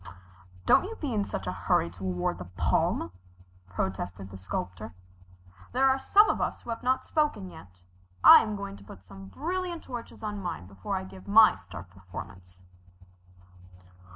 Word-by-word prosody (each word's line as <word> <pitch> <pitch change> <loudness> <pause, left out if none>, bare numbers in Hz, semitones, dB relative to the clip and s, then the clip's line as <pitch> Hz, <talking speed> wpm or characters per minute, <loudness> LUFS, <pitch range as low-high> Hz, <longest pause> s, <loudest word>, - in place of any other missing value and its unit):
"Don't - - +5
you 450 +3 -6
be 290 - -4
in 210 -2 +1
such 95 - -5
a 90 - -2
hurry 85 -1 +1
to 90 +2 -11
award 90 -2 -1
the 90 - -6
palm," 90 -1 0 0.6
protested 95 +1 -4
the - - -9
Sculptor. 95 +3 -5 0.8
"There 265 +2 +4
are 265 0 +3
some 415 +9 +5
of - - 0
us - - -2
who 235 - -5
have 230 - -4
not 255 +1 +1
spoken 295 - 0
yet. 95 - -15 0.4
I - - +11
am 215 -1 -3
going 200 - -6
to 100 - -15
put 95 -2 -13
some 95 +1 -12
brilliant 345 - -4
touches 240 -3 -8
on 210 -1 -4
mine 175 - -5
before 95 0 -5
I - - -2
give 95 0 -12
my 220 +1 +7
star 85 0 -10
performance." 90 0 -11
95 Hz, 170 wpm, -28 LUFS, -, 0.8 s, I